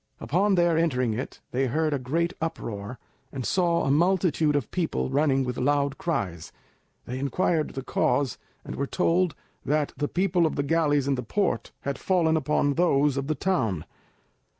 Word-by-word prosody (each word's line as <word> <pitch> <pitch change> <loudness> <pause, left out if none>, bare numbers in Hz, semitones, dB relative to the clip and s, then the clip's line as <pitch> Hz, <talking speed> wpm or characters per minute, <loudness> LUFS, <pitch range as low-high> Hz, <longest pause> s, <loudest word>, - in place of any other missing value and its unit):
Upon 195 +5 +2
their 170 -2 +3
entering 130 -8 +1
it 125 +5 -5
they 130 +1 +1
heard 155 +4 0
a 140 - 0
great 165 +7 -1
uproar, 115 -8 -4 0.3
and 130 -3 -5
saw 170 - +2
a 135 - +1
multitude 165 -2 +2
of 140 -6 -1
people 165 -6 -1
running 135 -1 +2
with 125 -1 -3
loud 140 +1 +1
cries. 95 - -3 0.5
They 125 +2 -5
inquired 155 +3 0
the 135 - -4
cause, 135 -1 0 0.3
and - - -6
were 140 - -1
told 180 +1 +1 0.3
that 150 0 0
the 145 - 0
people 180 -1 +2
of - - -4
the 140 - 0
galleys 145 -2 +2
in 140 - +2
the 125 - -2
port 125 - -1
had 140 -1 -3
fallen 170 -4 +2
upon 150 -1 +1
those 145 -4 +2
of 135 0 -2
the 155 - 0
town. 115 - 0
145 Hz, 175 wpm, -26 LUFS, 135-170 Hz, 0.5 s, their